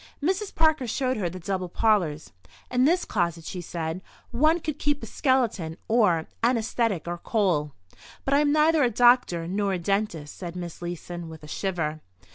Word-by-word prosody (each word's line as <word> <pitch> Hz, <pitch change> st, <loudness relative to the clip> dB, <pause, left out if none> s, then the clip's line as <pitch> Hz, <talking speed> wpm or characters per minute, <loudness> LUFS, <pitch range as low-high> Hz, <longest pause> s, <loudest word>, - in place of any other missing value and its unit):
Mrs. 380 Hz, +6 st, -1 dB
Parker 315 Hz, -5 st, +3 dB
showed 255 Hz, +2 st, 0 dB
her 185 Hz, -5 st, -1 dB
the 180 Hz, -, -8 dB
double 185 Hz, 0 st, -3 dB
parlours. 175 Hz, -8 st, +1 dB, 0.4 s
"In 250 Hz, +1 st, +3 dB
this 350 Hz, +5 st, +3 dB
closet," 170 Hz, -4 st, -1 dB
she 180 Hz, -, -5 dB
said, 165 Hz, +1 st, -4 dB, 0.3 s
"one 310 Hz, +8 st, +3 dB
could 305 Hz, -2 st, -4 dB
keep 290 Hz, 0 st, 0 dB
a -, -, -3 dB
skeleton 235 Hz, -, 0 dB
or 205 Hz, -8 st, +3 dB, 0.2 s
anaesthetic 230 Hz, -6 st, +1 dB
or 175 Hz, 0 st, -3 dB
coal—" 175 Hz, -, 0 dB, 0.5 s
"But 275 Hz, -, +1 dB
I 280 Hz, -, +5 dB
am 295 Hz, -1 st, +3 dB
neither 310 Hz, +1 st, +4 dB
a 250 Hz, -, +4 dB
doctor 240 Hz, -8 st, +4 dB
nor 200 Hz, +2 st, 0 dB
a -, -, 0 dB
dentist," 175 Hz, -4 st, -2 dB
said 175 Hz, -2 st, -7 dB
Miss 175 Hz, -2 st, -7 dB
Leeson, 175 Hz, -1 st, -6 dB
with 160 Hz, -1 st, -11 dB
a -, -, -9 dB
shiver. 160 Hz, -3 st, -2 dB
200 Hz, 175 wpm, -26 LUFS, 170-255 Hz, 0.5 s, I